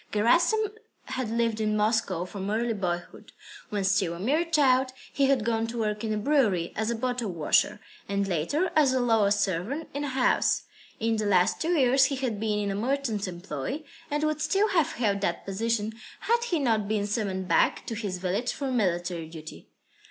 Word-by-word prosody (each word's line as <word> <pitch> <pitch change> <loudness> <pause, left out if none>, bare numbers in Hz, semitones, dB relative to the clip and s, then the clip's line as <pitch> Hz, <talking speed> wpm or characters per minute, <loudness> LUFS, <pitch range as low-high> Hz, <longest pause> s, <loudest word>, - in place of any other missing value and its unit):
Gerasim 345 - +3 0.4
had 260 -3 -2
lived 230 -1 0
in 215 0 +1
Moscow 210 -5 +1
from 195 +1 -5
early 230 +2 0
boyhood. 175 -4 -4 0.4
When 205 -2 -2
still 190 -3 +2
a - - -9
mere 285 - +1
child, 265 -6 +3 0.2
he 275 -1 +3
had 265 -5 +2
gone 225 -1 0
to 235 +1 -6
work 210 -1 -1
in 220 - -1
a 215 - 0
brewery 210 - +1
as 220 +2 -1
bottle 245 -1 -2
washer, 170 +5 +2 0.3
and 200 0 0
later 195 - 0
as 290 -4 +4
a 260 - +2
lower 225 -4 +3
servant 205 - -1
in 285 +1 -3
a - - -2
house. 260 -2 +2 0.4
In 225 0 +1
the 215 -1 -1
last 180 -3 +3
two 335 +2 +1
years 265 0 +5
he 275 - -1
had 255 -6 -2
been 215 -1 0
in 205 -1 -1
a - - -2
merchant's 230 -3 -1
employ, 175 - -5 0.3
and 295 +1 -1
would 310 0 0
still 395 +7 +2
have 335 -6 +2
held 200 -4 0
that 175 -3 -2
position, 220 +2 -1 0.3
had 470 +1 +1
he 355 -8 0
not 225 -8 +1
been 210 -1 0
summoned 200 -3 -2
back - - +2
to - - -4
his 205 -4 -3
village 190 +7 -1
for 275 -2 -3
military 175 -7 -1
duty. 160 -1 -10
220 Hz, 190 wpm, -27 LUFS, 200-265 Hz, 0.4 s, years